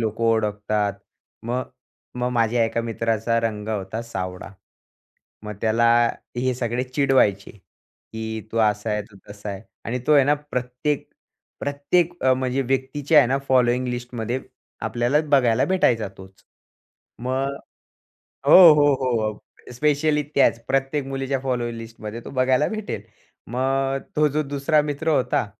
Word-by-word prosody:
लोकं 110 0 -2
ओळखतात. 105 -2 +1 0.5
मग 125 +2 -2 0.5
मग 125 - 0
माझ्या 115 0 +2
एका 115 +1 -1
मित्राचा 115 0 -1
रंग 110 -2 -3
होता 105 0 -3
सावळा. 95 -5 -6 1.0
मग 105 0 -5
त्याला 115 +1 +2 0.5
हे 130 +1 0
सगळे 120 0 -2
चिडवायचे, 130 -7 +2 0.6
की 110 0 -4
तू 115 - -1
असा 105 0 +1
आहे, 105 0 -1
तू 100 0 -18
तसा 105 0 -8
आहे. 100 0 -7 0.2
आणि 125 +2 -2
तो 150 - +4
आहे 140 -3 +6
ना 145 - +3
प्रत्येक 140 0 -3 0.5
प्रत्येक 145 +5 0
अ, 130 0 +4
म्हणजे 130 +1 -1
व्यक्तीच्या 135 +4 +1
आहे 140 - +6
ना 135 +2 +1
फॉलोइंग 125 -1 +3
लिस्टमध्ये 120 0 -3 0.5
आपल्याला 120 +6 +1
बघायला 125 -4 +4
भेटायचा 125 - +2
तोच. 95 0 -15 0.7
मग 135 +3 -2 0.9
हो, 170 +1 +10
हो, 145 -1 +4
हो. 115 -5 -1 0.3
स्पेशली 150 +3 +1
त्याच 135 -4 +4
प्रत्येक 135 +1 0
मुलीच्या 135 0 -2
फॉलो 125 -2 -2
लिस्टमध्ये 115 -1 -8
तो - - -7
बघायला 130 +2 +2
भेटेल. 215 -1 -5 0.4
मग 135 +3 0 0.2
तो 150 0 +4
जो 150 +2 0
दुसरा 145 +2 +1
मित्र 150 +2 -2
होता 135 -6 +1
125 Hz, 135 wpm, -23 LUFS, 115-135 Hz, 1.0 s, हो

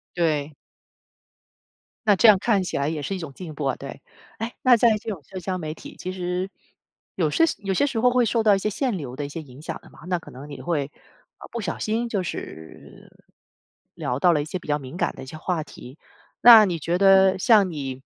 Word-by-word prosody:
对。 155 -3 0 1.5
那 205 - +6
这 225 - +5
样 210 -3 +8
看 205 -2 +1
起 180 - -3
来 140 +1 0
也 155 -2 -3
是 195 +8 -3
一 - - -5
种 160 -5 -7
进 165 +1 -8
步 145 - -4
啊， 135 - 0
对。 140 0 -9 0.4
诶， 225 +2 -4
那 255 -1 +6
在 225 -1 +4
这 215 - -8
种 190 -7 -5
社 185 +8 -8
交 185 0 -3
媒 155 -3 -5
体， - - -12
其 185 - -5
实 180 +1 -3 0.7
有 - - +1
是 330 - +2 0.2
有 195 -2 -2
些 235 - +2
时 235 -5 -2
候 250 +1 +4
会 250 -1 +3
受 225 +1 +1
到 210 -2 +5
一 - - -1
些 210 - -1
限 240 0 -1
流 130 -6 -7
的 145 - -4
一 - - -7
些 160 +3 -6
影 135 -1 -14
响 - - -6
的 - - -17
嘛， - - -18
那 180 -1 0
可 - - -14
能 140 +4 -11
你 - - -8
会， 150 -5 -2 0.5
呃， - - -11
不 235 - -4
小 175 -4 -3
心 230 +2 -1
就 205 -4 -1
是 80 - -9 0.8
聊 125 +2 -3
到 175 +3 +4
了 150 - +1
一 - - -4
些 180 +4 -5
比 - - -15
较 145 0 +1
敏 135 +4 -9
感 - - 0
的 - - -9
一 - - -9
些 155 +4 -9
话 165 -1 -2
题， 130 -1 -13 0.4
那 230 -3 +10
你 175 -4 -2
觉 170 +3 -1
得 190 0 +5
像 205 -2 +5
你 135 -4 -5
180 Hz, 255 characters per minute, -24 LUFS, 150-205 Hz, 1.5 s, 那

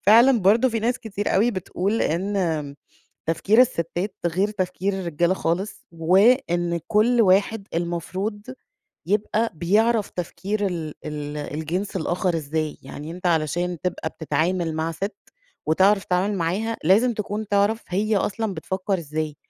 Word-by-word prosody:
فعلًا 235 +4 +7
برضه 225 +7 +5
في 225 -2 -2
ناس 240 +3 0
كتير 205 -3 -3
أوي 220 +5 +4
بتقول 195 +1 -1
إن 165 -5 -1 0.5
تفكير 200 +8 +4
الستات 185 -4 -1
غير 190 +5 +1
تفكير 190 0 -2
الرجال 175 -1 0
خالص، 185 +5 -2
وإن 175 0 +3
كل 230 +3 +4
واحد 200 +1 +2
المفروض 185 +5 -3 0.7
يبقى 215 +3 +1
بيعرف 210 +6 +2
تفكير 200 +4 -3
ال 165 -5 -4
ال 150 0 -5
الجنس 160 +7 -3
الآخر 175 0 0
إزاي، 155 0 -3
يعني 145 +3 -8
أنت 180 +2 -5
علشان 170 +2 0
تبقى 180 -3 -2
بتتعامل 165 +1 -1
مع 160 +1 -1
ست، 195 +6 -4 0.5
وتعرف 190 +5 +4
تتعامل 190 +3 0
معاها 195 +7 -1
لازم 220 +7 +4
تكون 210 0 -4
تعرف 205 +3 +2
هي 210 +4 +1
أصلًا 205 0 -1
بتفكّر 190 +3 -2
إزاي، 155 -1 -4
185 Hz, 130 wpm, -23 LUFS, 165-210 Hz, 0.7 s, فعلًا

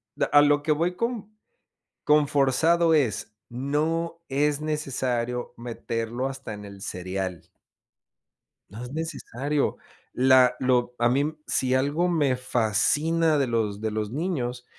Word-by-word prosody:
d - - 0
a 145 - +7
lo 145 0 +3
que 155 - +1
voy 170 +4 +1
con 225 -1 -3 0.7
con 150 -1 +4
forzado 160 +5 +3
es, 110 -7 0
no 155 +6 -2
es 145 +2 +1
necesario 125 -5 -2
meterlo 115 +1 -3
hasta 135 -4 -7
en 105 0 -9
el 100 -1 -11
cereal. 95 -2 -5 1.2
No 110 +5 -8
es 125 - -8
necesario, 150 -2 -2 0.4
la 130 -1 +5
lo 125 -1 +1
a 120 0 +3
mí, 130 +3 +2
m 155 +2 -2
si 130 0 0
algo 145 +7 +1
me 150 -7 +2
fascina 145 +7 +1
de 135 - +1
los 110 -3 -1
de 110 - -1
los 105 -1 -3
niños 125 -6 -3
135 Hz, 140 wpm, -25 LUFS, 120-150 Hz, 1.2 s, a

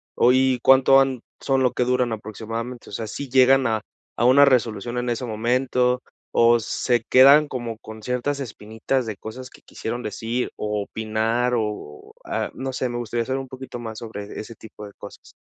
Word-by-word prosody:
¿Hoy 130 +1 +3
cuánto 135 0 +6
han 135 -2 +1 0.2
son 135 -1 +1
lo 125 -1 +2
que - - +1
duran 125 -1 +1
aproximadamente? 115 +3 -6
O - - -12
sea, 110 +3 -3
¿sí 135 +6 -6
llegan 130 0 +5
a 110 -1 0 0.3
a 120 - +1
una 135 +3 +7
resolución 120 -3 0
en 120 0 -1
ese 120 +2 -3
momento 125 +2 0 0.3
o 120 0 +4
se 120 +1 0
quedan 140 +4 +7
como 120 -4 -5
con 110 0 -11
ciertas 125 +5 -2
espinitas 110 +1 -3
de 110 -2 -4
cosas 125 +6 -9
que - - -17
quisieron 120 +2 -5
decir 115 +2 -3
o 105 0 -2
opinar? 110 +4 -1
O, 105 -10 -5
ah, - - -2
no 130 0 -4
sé, 130 0 -2
me 120 - -4
gustaría 120 0 -2
saber 130 +1 -1
un 135 - -7
poquito 130 -1 -8
más 110 -2 -7
sobre 105 -3 -7
ese 115 +1 -8
tipo 105 -1 -11
de 100 - -14
cosas. - - -12
120 Hz, 185 wpm, -23 LUFS, 110-130 Hz, 0.3 s, una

